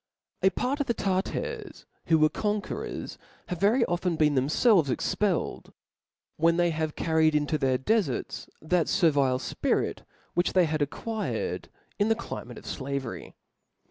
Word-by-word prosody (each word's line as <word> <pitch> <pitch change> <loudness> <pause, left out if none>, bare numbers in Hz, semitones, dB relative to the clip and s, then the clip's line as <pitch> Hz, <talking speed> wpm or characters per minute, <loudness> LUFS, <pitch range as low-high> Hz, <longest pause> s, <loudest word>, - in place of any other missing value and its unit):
A 190 - +5
part 255 - -2
of 285 - -1
the 235 - +1
Tartar^ 360 - -3 0.2
who 160 - +5
were 155 0 +5
conauerors, 210 +6 -3 0.3
havQ 180 - -3
very 230 +5 +4
often 175 0 -1
been 150 -2 +3
themfelves 155 - +3
ejcpelled 185 +7 -1
i^ - - -20 0.7
whc^ 165 +1 +4
they 175 -1 +3
have 155 -1 -2
carried 160 -1 +2
into 150 +1 +1
their 130 -1 +2
defarts 215 - -1
that 170 +1 +2
fervile 145 -8 +3
fpi 130 - 0
rit, - - -5 0.3
which 175 +1 +1
they 185 -2 +5
had 155 -1 -1
acquired 220 +10 -3 0.3
in 205 +2 +3
the 225 - +4
climate 125 - -7
of - - -6
(la 140 +1 -2
very. 130 -4 -7
170 Hz, 155 wpm, -27 LUFS, 150-210 Hz, 0.7 s, A